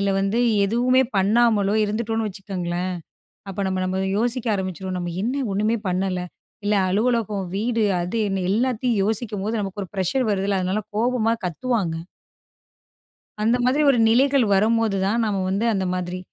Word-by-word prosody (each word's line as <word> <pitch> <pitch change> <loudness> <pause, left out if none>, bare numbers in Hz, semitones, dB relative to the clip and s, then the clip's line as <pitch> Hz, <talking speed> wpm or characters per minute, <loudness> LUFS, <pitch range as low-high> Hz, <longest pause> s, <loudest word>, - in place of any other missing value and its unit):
இல்ல 200 0 +1
வந்து 195 +4 0 0.3
எதுவுமே 245 +5 +3
பண்ணாமலோ 210 0 +3
இருந்துட்டோம்னு 225 +1 -1
வச்சுக்கோங்களேன். 185 -2 -4 0.6
அப்ப 195 - -7
நம்ம 185 0 -1
நம்ம 190 +1 -1
யோசிக்க 245 0 -1
ஆரம்பிச்சுருவோம் 185 -1 -4
நம்ம 175 -1 -3
என்ன 265 +4 -1
ஒண்ணுமே 215 +3 +1
பண்ணல 185 0 -1 0.5
இல்ல 210 - +2 0.2
அலுவலகம் 215 -2 0
வீடு 225 +1 0 0.2
அது 180 +6 -3
என்ன 195 -1 -1
எல்லாத்தையும் 240 0 +1
யோசிக்கும்போது 215 0 -2
நமக்கு 195 +1 -5
ஒரு 180 - -12
ப்ரெஷர் 210 +7 0
வருதுல்ல 195 0 0
அதனால 190 +4 -1
கோபமா 230 0 +1
கத்துவாங்க. 180 -1 -1 1.5
அந்த 230 +3 +3
மாதிரி 270 +4 +2
ஒரு 245 - +2
நிலைகள் 265 +2 +4
வரும்போது 220 0 +2
தான் 230 +3 +1
நாம 200 -3 -1
வந்து 200 +4 0
அந்த 190 -1 0
மாதிரி 180 0 -3
210 Hz, 145 wpm, -23 LUFS, 190-235 Hz, 1.5 s, நிலைகள்